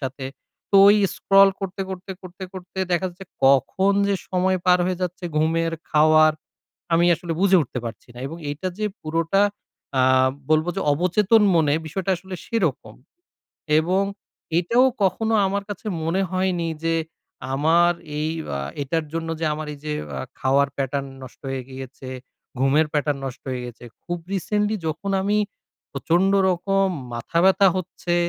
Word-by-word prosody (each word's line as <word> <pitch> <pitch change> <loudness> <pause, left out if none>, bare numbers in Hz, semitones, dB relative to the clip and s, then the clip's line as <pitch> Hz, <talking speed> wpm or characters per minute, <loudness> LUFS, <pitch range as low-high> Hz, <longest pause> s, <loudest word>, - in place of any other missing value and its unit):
সাথে। 135 0 -5 0.5
তো 200 - +5
ওই 205 - +7 0.2
স্ক্রল 195 0 +6
করতে, 195 0 -5
করতে, 185 +1 -7
করতে, 185 +1 -11
করতে 185 0 -9
দেখা 175 +2 +1
যাচ্ছে 185 +2 -12 0.2
কখন 140 +9 +3 0.2
যে 200 - +2
সময় 185 0 +1
পার 180 0 +6
হয়ে 185 -1 -2
যাচ্ছে 180 0 -4
ঘুমের, 165 +1 +1 0.2
খাওয়ার, 155 0 +5 0.6
আমি 170 +1 +4
আসলে 170 +1 -5
বুঝে 195 -1 +5
উঠতে 125 -1 -5
পারছি 115 +1 -8
না। - - -11
এবং 165 +4 -7 0.2
এটা 170 +6 -4
যে 215 - 0
পুরোটা 165 +5 +1 0.6
আ - - +4 0.5
বলবো 155 +2 +3
যে - - -1
অবচেতন 190 +7 +3
মনে, 155 -4 +3
বিষয়টা 190 +4 -3
আসলে 185 +2 -9
সেরকম। 155 - -1 0.9
এবং 185 +4 +1 0.6
এটাও 235 +9 +3 0.2
কখনো 225 +4 +1
আমার 200 +1 -1
কাছে 205 +2 -7 0.2
মনে 175 +4 +1
হয়নি 185 -3 0 0.2
যে, 165 - +2 0.6
আমার 165 +5 +4 0.3
এই 155 +1 0 0.3
আ - - -3 0.2
এটার 160 +3 -1
জন্য 165 0 -3
যে - - -1
আমার 155 0 -5
এইযে 150 +1 -6 0.3
আ - - -3 0.2
খাওয়ার 135 +1 +3
pattern 140 0 -1 0.2
নষ্ট 130 - -14
হয়ে 135 -1 -3
গিয়েছে, 130 0 -9 0.5
ঘুমের 145 +4 +3
pattern 145 -1 0
নষ্ট 130 - -7
হয়ে 125 -1 -3
গেছে। 120 0 -11 0.2
খুব 175 0 -3 0.2
রিসেন্টলি 210 +3 0
যখন 170 +6 -4
আমি 205 +2 +1 0.5
প্রচন্ড 170 +7 +2 0.2
রকম 195 +2 +1 0.3
মাথা 120 +8 -2
ব্যথা 190 +1 +5
হচ্ছে, 180 -1 -3
170 Hz, 155 wpm, -23 LUFS, 150-190 Hz, 0.9 s, ওই